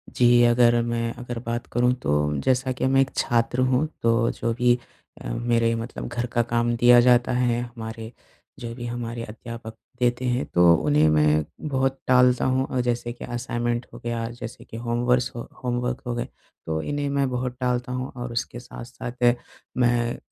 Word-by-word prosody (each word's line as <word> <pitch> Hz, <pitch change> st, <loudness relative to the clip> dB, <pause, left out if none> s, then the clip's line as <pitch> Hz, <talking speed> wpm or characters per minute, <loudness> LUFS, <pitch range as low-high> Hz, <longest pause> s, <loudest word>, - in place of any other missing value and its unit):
जी, 120 Hz, -1 st, +5 dB
अगर 120 Hz, 0 st, +4 dB
मैं 115 Hz, 0 st, -1 dB
अगर 120 Hz, -1 st, -5 dB
बात 120 Hz, 0 st, -3 dB
करूँ 125 Hz, +1 st, +3 dB
तो, 75 Hz, 0 st, +1 dB
जैसा 130 Hz, 0 st, +1 dB
कि 130 Hz, -, -2 dB
मैं 135 Hz, 0 st, +4 dB
एक 135 Hz, -, 0 dB
छात्र 120 Hz, +1 st, +1 dB
हूँ। 130 Hz, +3 st, +2 dB, 0.2 s
तो 115 Hz, 0 st, +3 dB
जो 115 Hz, -1 st, -2 dB
भी 125 Hz, 0 st, +3 dB, 0.4 s
अ, -, -, -6 dB
मेरे 115 Hz, -1 st, +1 dB
मतलब 115 Hz, +2 st, -5 dB
घर 120 Hz, 0 st, -3 dB
का 120 Hz, -, +3 dB
काम 120 Hz, 0 st, 0 dB
दिया 120 Hz, +1 st, +7 dB
जाता 125 Hz, 0 st, +4 dB
है, 120 Hz, -1 st, +1 dB
हमारे 115 Hz, -2 st, -7 dB, 0.5 s
जो 115 Hz, -2 st, -6 dB
भी 120 Hz, -1 st, -6 dB
हमारे 120 Hz, -1 st, -4 dB
अध्यापक 115 Hz, +1 st, -8 dB, 0.3 s
देते 125 Hz, +1 st, +1 dB
हैं, 125 Hz, +1 st, 0 dB
तो 85 Hz, -1 st, +5 dB
उन्हें 75 Hz, 0 st, +3 dB
मैं 75 Hz, 0 st, +3 dB, 0.3 s
बहुत 135 Hz, 0 st, 0 dB
टालता 125 Hz, -1 st, +4 dB
हूँ, 130 Hz, +1 st, +1 dB
और 130 Hz, -1 st, -1 dB
जैसे 120 Hz, -1 st, -2 dB
कि -, -, -8 dB
असाइनमेंट 120 Hz, 0 st, -2 dB
हो -, -, -9 dB
गया 115 Hz, -1 st, -2 dB
जैसे 120 Hz, -1 st, -8 dB
कि 115 Hz, -, -9 dB
होमेवर्से 120 Hz, +1 st, 0 dB
अ, -, -, -5 dB, 0.2 s
होमवर्क 125 Hz, +1 st, -2 dB
हो 120 Hz, -, -2 dB
गए। 120 Hz, -, -3 dB, 0.4 s
तो 80 Hz, 0 st, -2 dB
इन्हें 145 Hz, -, -2 dB
मैं 140 Hz, -1 st, +1 dB
बहुत 125 Hz, 0 st, -3 dB
टालता 125 Hz, 0 st, -1 dB
हूँ, 130 Hz, +1 st, -3 dB
और 120 Hz, 0 st, -5 dB
उसके 120 Hz, +1 st, -3 dB
साथ-साथ, 120 Hz, 0 st, -2 dB, 0.4 s
मैं 120 Hz, -1 st, +1 dB
120 Hz, 180 wpm, -24 LUFS, 115-125 Hz, 0.5 s, दिया